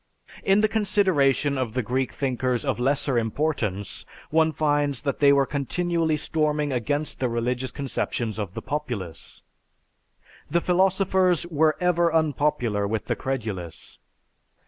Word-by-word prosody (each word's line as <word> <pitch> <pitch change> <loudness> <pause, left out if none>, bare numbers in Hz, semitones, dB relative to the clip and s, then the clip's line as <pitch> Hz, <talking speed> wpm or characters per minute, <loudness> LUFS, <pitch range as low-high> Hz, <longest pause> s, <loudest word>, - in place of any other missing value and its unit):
In 195 +2 +4
the 215 - +4
consideration 185 -10 +2
of 120 -4 -2
the 125 - 0
Greek 130 +3 -1
thinkers 130 -1 -1
of 135 -3 -1
lesser 135 0 +2
importance 110 -5 -2 0.3
one 160 0 +3
finds 145 -3 0
that 140 -2 -2
they 140 -1 +6
were 140 -1 +4
continually 160 +3 0
storming 150 -1 0
against 145 +4 -2
the 125 - 0
religious 125 +2 -1
conceptions 120 -4 -3
of 100 -3 -4
the - - -5
populace. 110 - -5 1.1
The 170 +4 +2
philosophers 185 -1 +2
were 155 -2 +2
ever 175 -1 +2
unpopular 145 -9 +1
with 110 +1 -2
the - - -1
credulous. 105 -11 -5
140 Hz, 130 wpm, -25 LUFS, 125-160 Hz, 1.1 s, they